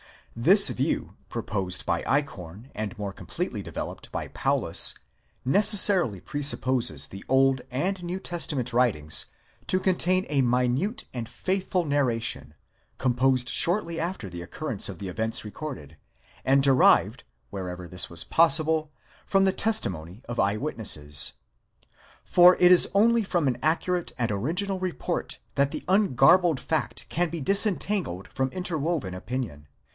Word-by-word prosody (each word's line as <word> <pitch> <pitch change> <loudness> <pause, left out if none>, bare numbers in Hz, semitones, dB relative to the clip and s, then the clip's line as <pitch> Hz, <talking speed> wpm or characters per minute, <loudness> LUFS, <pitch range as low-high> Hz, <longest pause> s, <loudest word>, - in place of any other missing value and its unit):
This 185 - +6
view - - -2
proposed 95 -4 -3
by - - 0
Eichhorn, 125 - -3
and 105 -3 -5
more 100 -1 -4
completely - - -5
developed - - -7
by - - -5
Paulus, - - +2 0.5
necessarily 190 - +4
presupposes 130 - 0
the 95 +4 -11
Old 135 0 +3
and 180 +9 -2
New 175 +2 -4
Testament 145 -9 -3
writings 100 -12 +2 0.4
to 185 - +2
con 185 -1 +1
tain 185 +2 +1
a 145 -2 +2
minute 125 - 0
and 120 -2 -5
faithful 185 +6 -2
narration, 115 - -1 0.4
composed 130 0 +1
shortly 170 -2 +1
after 170 - -4
the 85 -1 -8
occurrence 110 - -4
of 95 - -7
the 95 - -5
events 110 +4 -2
recorded, 105 - -8 0.5
and 135 +1 +3
derived, 135 -2 +4 0.3
wherever 90 -2 -6
this 90 0 -3
was 85 -1 -4
possible, 160 -1 +2 0.4
from 195 -1 +2
the 190 -1 +2
testi 220 - +1
mony 85 +7 -10
of 120 0 -5
eye 100 +2 +1
witnesses. 90 - -1 0.9
For 180 0 +6
it 180 0 +5
is 180 - +8
only 230 +3 +4
from 175 -7 -1
an 125 - 0
accurate 170 +3 -1
and 120 -3 -1
original 175 - -2
report 185 -2 -3 0.2
that 140 0 +2
the 155 - -5
ungarbled 175 - +4
fact 160 - -3
can 175 +1 -1
be 165 -1 -5
disentangled 195 - +1
from 130 0 -1
interwoven 160 - -3
opinion. 95 - -6
135 Hz, 140 wpm, -26 LUFS, 110-175 Hz, 0.9 s, is